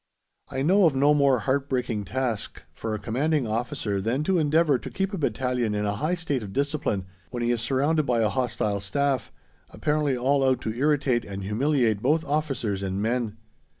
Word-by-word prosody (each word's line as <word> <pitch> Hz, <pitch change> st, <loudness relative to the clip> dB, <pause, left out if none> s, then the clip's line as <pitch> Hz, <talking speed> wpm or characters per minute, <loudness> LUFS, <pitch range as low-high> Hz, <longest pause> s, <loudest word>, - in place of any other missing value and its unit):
I 135 Hz, -, -2 dB
know 190 Hz, +5 st, +5 dB
of 145 Hz, -, 0 dB
no 145 Hz, +2 st, +4 dB
more 140 Hz, -4 st, +3 dB
heart 135 Hz, +5 st, 0 dB
breaking 120 Hz, -5 st, -1 dB
task 120 Hz, +1 st, -3 dB
for 110 Hz, -1 st, -3 dB
a -, -, -5 dB
Commanding 135 Hz, +7 st, 0 dB
Officer 110 Hz, -3 st, -2 dB
than 120 Hz, +8 st, 0 dB
to 185 Hz, +2 st, +2 dB
endeavour 150 Hz, -2 st, +3 dB
to -, -, -7 dB
keep 195 Hz, +1 st, -2 dB
a -, -, -1 dB
battalion 125 Hz, -6 st, 0 dB
in 105 Hz, 0 st, -1 dB
a 100 Hz, 0 st, -1 dB
high 155 Hz, +10 st, 0 dB
state 155 Hz, -7 st, -2 dB
of 100 Hz, -2 st, -7 dB
discipline 140 Hz, -8 st, -1 dB, 0.2 s
when 120 Hz, -1 st, -3 dB
he 120 Hz, -, +2 dB
is 120 Hz, -2 st, 0 dB
surrounded 140 Hz, +5 st, +1 dB
by 120 Hz, -2 st, +2 dB
a 110 Hz, -, +3 dB
hostile 115 Hz, -5 st, -1 dB
staff, 135 Hz, +6 st, -1 dB, 0.4 s
apparently 150 Hz, -3 st, 0 dB
all 135 Hz, +3 st, +2 dB
out 130 Hz, -1 st, +3 dB
to 110 Hz, -, -3 dB
irritate 135 Hz, -2 st, +1 dB
and 100 Hz, -1 st, -6 dB
humiliate 115 Hz, 0 st, +1 dB
both 160 Hz, +5 st, +2 dB
officers 135 Hz, -9 st, -1 dB
and 95 Hz, 0 st, -2 dB
men. 115 Hz, 0 st, -1 dB
130 Hz, 190 wpm, -26 LUFS, 110-145 Hz, 0.4 s, know